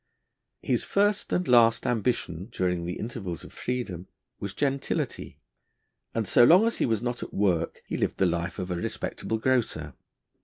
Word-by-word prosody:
His -, -, +2 dB
first 205 Hz, 0 st, +1 dB
and 180 Hz, -, 0 dB
last 115 Hz, -2 st, +5 dB
ambition 105 Hz, -5 st, -1 dB
during 90 Hz, -3 st, -1 dB
the 90 Hz, -, -4 dB
intervals 100 Hz, -7 st, -5 dB
of -, -, -12 dB
freedom 110 Hz, -8 st, -4 dB, 0.3 s
was 100 Hz, -1 st, -5 dB
gentility, 140 Hz, -1 st, -2 dB, 0.8 s
and 115 Hz, -3 st, 0 dB
so 120 Hz, -, +6 dB
long 180 Hz, -, +7 dB
as 230 Hz, -, 0 dB
he -, -, +2 dB
was 110 Hz, -1 st, 0 dB
not 120 Hz, 0 st, -2 dB
at -, -, -7 dB
work 90 Hz, -5 st, 0 dB
he -, -, -3 dB
lived -, -, -1 dB
the 95 Hz, -, +3 dB
life 85 Hz, 0 st, -1 dB
of 90 Hz, -2 st, -4 dB
a -, -, 0 dB
respectable 110 Hz, +5 st, -3 dB
grocer. 125 Hz, 0 st, 0 dB
110 Hz, 165 wpm, -27 LUFS, 90-125 Hz, 0.8 s, long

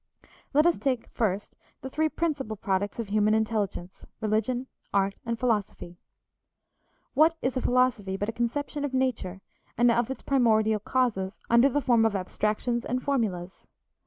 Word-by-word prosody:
Let 300 Hz, +2 st, +5 dB
us 345 Hz, -, +3 dB
take 260 Hz, -4 st, -1 dB
first 205 Hz, -3 st, -2 dB, 0.3 s
the 265 Hz, -, -4 dB
three 315 Hz, +2 st, +1 dB
principal 285 Hz, -10 st, -2 dB
products 195 Hz, 0 st, -1 dB
of 230 Hz, -4 st, -4 dB
human 215 Hz, +1 st, +3 dB
intelligence 210 Hz, -5 st, -2 dB, 0.2 s
religion, 220 Hz, +4 st, 0 dB, 0.3 s
art, 195 Hz, 0 st, +2 dB
and 230 Hz, 0 st, -1 dB
philosophy. 205 Hz, -7 st, -2 dB, 1.1 s
What 315 Hz, +4 st, +4 dB
is 255 Hz, +1 st, 0 dB
a 255 Hz, -, 0 dB
philosophy 245 Hz, -7 st, +1 dB
but 205 Hz, -, -2 dB
a -, -, -1 dB
conception 285 Hz, +5 st, -2 dB
of 275 Hz, -2 st, -2 dB
nature 220 Hz, -8 st, -1 dB, 0.4 s
and 240 Hz, +1 st, +5 dB
of 235 Hz, 0 st, +1 dB
its 265 Hz, -, -6 dB
primordial 220 Hz, -5 st, +3 dB
causes 210 Hz, -4 st, -1 dB
under 235 Hz, +4 st, +6 dB
the 290 Hz, +2 st, 0 dB
form 235 Hz, -3 st, +3 dB
of 220 Hz, -2 st, +2 dB
abstractions 215 Hz, +5 st, -1 dB
and 250 Hz, +1 st, -2 dB
formulas? 195 Hz, -10 st, -2 dB
230 Hz, 155 wpm, -27 LUFS, 205-255 Hz, 1.1 s, under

